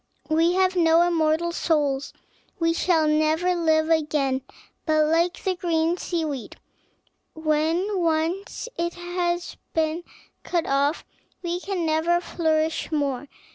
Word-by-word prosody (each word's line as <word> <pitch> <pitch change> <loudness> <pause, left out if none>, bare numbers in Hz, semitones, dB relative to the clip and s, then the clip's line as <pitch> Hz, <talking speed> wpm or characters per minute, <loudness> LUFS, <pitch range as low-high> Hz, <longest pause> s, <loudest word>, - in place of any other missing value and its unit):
We 330 +2 +3
have 375 0 +2
not 340 0 +4
immortal 325 0 +1
souls, 290 -5 0 0.5
we 330 -1 +2
shall 330 -2 +2
never 310 +4 +2
live 320 -2 +2
again; 295 -4 +1 0.4
but, 310 -1 +3
like 335 +3 +1
the 375 -1 0
green 335 -1 +1
sea 340 -3 -2
weed, 280 -6 -5 0.8
when 320 +6 0
once 335 +6 -1
it 340 0 -1
has 350 0 -2 0.2
been 320 +1 0 0.4
cut 345 -2 -1
off, 280 +3 +1 0.4
we 345 0 -2
can 370 -2 -3
never 320 +2 +2
flourish 320 -2 -1
more. 285 -3 -1
325 Hz, 125 wpm, -24 LUFS, 310-345 Hz, 0.8 s, not